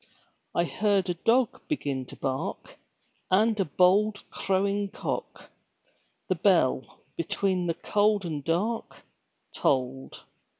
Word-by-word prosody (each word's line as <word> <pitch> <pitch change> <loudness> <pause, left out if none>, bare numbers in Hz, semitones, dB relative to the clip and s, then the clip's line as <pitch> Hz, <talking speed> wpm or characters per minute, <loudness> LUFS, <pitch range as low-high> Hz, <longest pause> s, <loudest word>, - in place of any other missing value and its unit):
I 170 - +3
heard 195 0 +1
a - - 0
dog 230 +8 +1
begin 140 - -2
to - - -11
bark 135 0 -4 0.5
And 215 +3 +3
a 195 - +2
bold 195 +7 +3
crowing 200 +1 0
cock; - - -5 0.8
The - - +2
bell, - - +1
between 185 -3 0
the 165 - 0
cold 205 0 +1
and 150 -4 -4
dark, 205 +9 -2 0.5
Tolled. 130 0 -1
190 Hz, 115 wpm, -27 LUFS, 165-210 Hz, 0.8 s, I